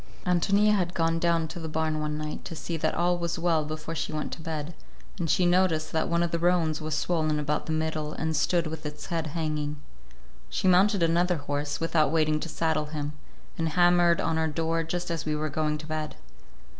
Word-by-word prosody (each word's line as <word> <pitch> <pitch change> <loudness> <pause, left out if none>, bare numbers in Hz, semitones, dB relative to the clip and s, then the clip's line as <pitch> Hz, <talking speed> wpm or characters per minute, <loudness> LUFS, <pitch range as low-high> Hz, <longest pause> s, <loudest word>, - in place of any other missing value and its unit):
Ántonia 200 +4 +3
had 180 -3 -1
gone 165 0 +1
down 170 -1 +2
to 170 +2 -6
the 160 -1 -5
barn 155 0 0
one 150 0 -2
night 150 0 -5
to 165 - -6
see 165 +2 -4
that 160 - 0
all 175 +1 +1
was 170 0 -2
well 165 -2 +2
before 155 +1 -5
she 160 - -3
went 155 -1 -3
to - - -7
bed, 160 0 -4 0.5
and 165 -2 -1
she 180 - +3
noticed 175 -3 +2
that 160 - 0
one 170 0 +2
of 170 - -1
the 170 - 0
roans 165 -3 +2
was 155 0 -2
swollen 155 -2 0
about 150 0 -1
the - - -2
middle 155 -1 -1
and 160 +1 -2
stood 170 +3 +2
with 155 0 -5
its 150 0 -6
head 165 -1 -1
hanging. 150 -1 -2 0.7
She - - -1
mounted 190 +1 +5
another 175 +2 +2
horse, 145 0 -3
without 160 -3 +2
waiting 155 -1 +2
to 165 - -5
saddle 160 -1 0
him, 150 -1 -4 0.5
and 165 0 +1
hammered 175 -1 +5
on 160 0 0
our 160 - +1
door 165 +1 0
just 175 +2 -3
as 165 -1 -2
we 155 -1 -1
were 155 +1 -2
going 150 +1 0
to 150 - -9
bed. 155 -1 -4
160 Hz, 215 wpm, -27 LUFS, 155-170 Hz, 0.7 s, mounted